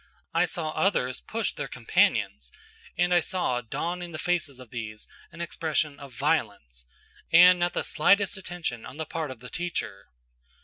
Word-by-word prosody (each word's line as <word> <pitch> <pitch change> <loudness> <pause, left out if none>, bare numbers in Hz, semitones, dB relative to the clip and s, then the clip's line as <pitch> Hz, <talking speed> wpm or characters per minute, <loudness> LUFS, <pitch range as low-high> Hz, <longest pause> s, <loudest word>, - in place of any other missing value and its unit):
I 165 +2 +4
saw 160 -3 -3
others 130 -10 +1
push 225 0 -2
their - - -4
companions, - - +1 0.5
and 175 0 +3
I 175 - +6
saw 165 -8 -1
dawn 165 +10 -3
in 175 -1 -7
the - - -4
faces 155 -6 -1
of 125 -3 -13
these 110 -3 -6 0.2
an 170 - -9
expression 155 -3 -1
of 140 -2 -10
violence; 105 - -1 0.4
and 180 +2 +8
not 175 0 +1
the - - -1
slightest 200 +6 +3
attention 175 - -4
on 130 - -10
the 160 - -3
part 160 -1 -4
of 130 -3 -9
the 125 - -9
teacher. 170 - -4
160 Hz, 170 wpm, -27 LUFS, 125-175 Hz, 0.5 s, and